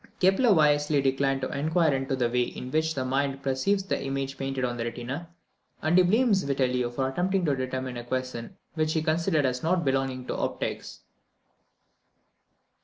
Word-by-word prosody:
Kepler 195 Hz, +6 st, +4 dB
wisely 150 Hz, -3 st, +4 dB
declined 135 Hz, 0 st, +1 dB
to 130 Hz, -, -3 dB
inquire 155 Hz, +2 st, +2 dB
into 135 Hz, 0 st, -1 dB
the 125 Hz, -2 st, +1 dB
way 125 Hz, +1 st, +1 dB
in 125 Hz, +1 st, -4 dB
which 160 Hz, +1 st, +1 dB
the 130 Hz, -, -2 dB
mind 135 Hz, +1 st, -1 dB
perceives 140 Hz, +10 st, +1 dB
the 195 Hz, -, -2 dB
images 135 Hz, 0 st, -2 dB
painted 135 Hz, -1 st, -2 dB
on 120 Hz, -1 st, -2 dB
the 115 Hz, -1 st, -3 dB
retina, 125 Hz, +8 st, -5 dB, 0.5 s
and 155 Hz, +2 st, +1 dB
he 185 Hz, -, +7 dB
blames 210 Hz, +1 st, +3 dB
Vitellio 125 Hz, -3 st, 0 dB
for 130 Hz, +2 st, -1 dB
attempting 180 Hz, +6 st, 0 dB
to 145 Hz, -3 st, +2 dB
determine 130 Hz, -1 st, -3 dB
a 120 Hz, -, -5 dB
question 130 Hz, -1 st, -4 dB, 0.2 s
which 155 Hz, -1 st, 0 dB
he 160 Hz, -, 0 dB
considered 160 Hz, -1 st, +1 dB
as 125 Hz, -1 st, -1 dB
not 170 Hz, 0 st, +1 dB
belonging 135 Hz, -1 st, 0 dB
to -, -, -3 dB
optics. -, -, -4 dB
135 Hz, 175 wpm, -27 LUFS, 130-160 Hz, 0.5 s, he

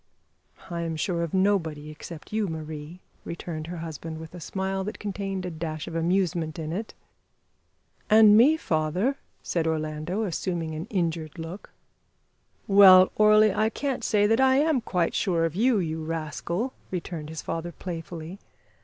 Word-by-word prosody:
"I 170 Hz, 0 st, -2 dB
am 165 Hz, -1 st, -2 dB
sure 170 Hz, +2 st, -1 dB
of 170 Hz, -2 st, -2 dB
nobody 165 Hz, -6 st, 0 dB
except 155 Hz, +4 st, -10 dB
you, 215 Hz, -2 st, +1 dB
Marie," 160 Hz, +1 st, -7 dB, 0.2 s
returned 165 Hz, -2 st, -6 dB
her 175 Hz, +1 st, -6 dB
husband, 160 Hz, 0 st, -6 dB
with 160 Hz, +1 st, -10 dB
a 180 Hz, -, -8 dB
smile 190 Hz, +2 st, -3 dB
that 210 Hz, -, -5 dB
contained 195 Hz, -2 st, -4 dB
a 180 Hz, -, -4 dB
dash 155 Hz, -1 st, -5 dB
of 170 Hz, -, -6 dB
amusement 170 Hz, -1 st, 0 dB
in 160 Hz, -1 st, -4 dB
it. 215 Hz, +5 st, -5 dB, 1.1 s
"And 215 Hz, -1 st, +8 dB
me, 275 Hz, +8 st, +6 dB
father," 180 Hz, -, 0 dB, 0.3 s
said 165 Hz, -2 st, -1 dB
Orlando, 155 Hz, +5 st, -2 dB
assuming 170 Hz, -3 st, -2 dB
an 155 Hz, +2 st, -5 dB
injured 165 Hz, -6 st, -2 dB
look. 165 Hz, +4 st, -7 dB, 1.0 s
"Well, 190 Hz, -2 st, +8 dB
Orley, 215 Hz, -1 st, +5 dB
I 215 Hz, +2 st, +2 dB
can't 270 Hz, +2 st, -3 dB
say 205 Hz, -2 st, +3 dB
that 225 Hz, +4 st, +3 dB
I 265 Hz, 0 st, +5 dB
am 290 Hz, -2 st, +3 dB
quite 180 Hz, -6 st, 0 dB
sure 170 Hz, -5 st, +1 dB
of 165 Hz, -, -2 dB
you, 230 Hz, +5 st, +3 dB
you 160 Hz, -3 st, -2 dB
rascal," 165 Hz, -, -3 dB, 0.2 s
returned 170 Hz, -4 st, -5 dB
his 160 Hz, 0 st, -6 dB
father 165 Hz, +1 st, -4 dB
playfully. 170 Hz, +1 st, -7 dB
175 Hz, 155 wpm, -26 LUFS, 160-200 Hz, 1.1 s, And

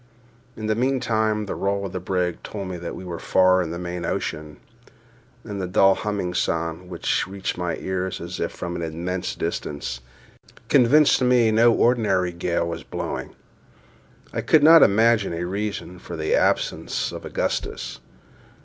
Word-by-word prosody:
In 110 Hz, -, -5 dB
the 110 Hz, -, +1 dB
meantime 110 Hz, -3 st, 0 dB
the -, -, -4 dB
roll 100 Hz, 0 st, -1 dB
of 95 Hz, -, -5 dB
the 90 Hz, -, -2 dB
brig 90 Hz, -1 st, -2 dB
told 100 Hz, -3 st, -6 dB
me 90 Hz, -, -4 dB
that 85 Hz, 0 st, -6 dB
we 95 Hz, -, -8 dB
were 85 Hz, -2 st, -5 dB
far 95 Hz, 0 st, +4 dB
in 85 Hz, -, -3 dB
the 85 Hz, -, -4 dB
main 90 Hz, 0 st, -5 dB
ocean, 75 Hz, -2 st, -3 dB, 0.9 s
and 100 Hz, -3 st, -5 dB
a 90 Hz, -, -2 dB
dull 95 Hz, +1 st, +5 dB
humming 100 Hz, -4 st, -3 dB
sound, 85 Hz, +1 st, -2 dB
which 85 Hz, 0 st, -1 dB
reached 95 Hz, 0 st, -4 dB
my 90 Hz, -2 st, -2 dB
ears 95 Hz, 0 st, -3 dB
as 85 Hz, +2 st, -6 dB
if 85 Hz, -, -1 dB
from 85 Hz, -1 st, -5 dB
an 85 Hz, -, -4 dB
immense 85 Hz, +3 st, -3 dB
distance, 60 Hz, -4 st, -4 dB, 0.7 s
convinced 140 Hz, +3 st, +5 dB
me 125 Hz, -3 st, +4 dB
no 115 Hz, +2 st, +5 dB
ordinary 110 Hz, -7 st, +2 dB
gale 85 Hz, 0 st, -1 dB
was 85 Hz, -1 st, -4 dB
blowing. -, -, -5 dB, 1.0 s
I -, -, -1 dB
could 155 Hz, -2 st, +4 dB
not 165 Hz, +1 st, +9 dB
imagine 110 Hz, -2 st, +4 dB
a 85 Hz, +1 st, -3 dB
reason 100 Hz, -1 st, -4 dB
for -, -, -8 dB
the 80 Hz, 0 st, -1 dB
absence -, -, 0 dB
of -, -, -8 dB
Augustus. -, -, -3 dB
95 Hz, 165 wpm, -23 LUFS, 85-110 Hz, 1.0 s, not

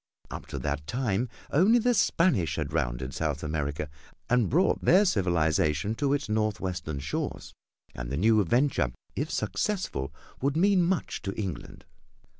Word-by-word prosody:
Up -, -, -7 dB
to -, -, -5 dB
that 75 Hz, +3 st, -3 dB
time 120 Hz, -2 st, -1 dB, 0.2 s
only 195 Hz, +10 st, +5 dB
the 245 Hz, +1 st, +3 dB
Spanish 165 Hz, -, +2 dB
had -, -, -3 dB
rounded 60 Hz, +2 st, -2 dB
South 75 Hz, -1 st, -2 dB
America 75 Hz, -1 st, -2 dB, 0.4 s
and 125 Hz, -4 st, +3 dB
brought 175 Hz, +8 st, +2 dB
their 190 Hz, +4 st, +6 dB
civilization 85 Hz, -, +1 dB
to 140 Hz, +4 st, 0 dB
its 140 Hz, -2 st, -1 dB
northwestern 95 Hz, -7 st, -2 dB
shores, 70 Hz, -, -4 dB, 0.4 s
and -, -, -6 dB
the 70 Hz, -, -2 dB
new 110 Hz, +4 st, +4 dB
venture, 120 Hz, -, +1 dB, 0.2 s
if -, -, -2 dB
successful, 180 Hz, -, -2 dB, 0.3 s
would 140 Hz, +3 st, +1 dB
mean 195 Hz, +1 st, +4 dB
much 175 Hz, +1 st, -1 dB
to 95 Hz, 0 st, -5 dB
England. 95 Hz, -7 st, -6 dB
105 Hz, 145 wpm, -28 LUFS, -, 0.4 s, their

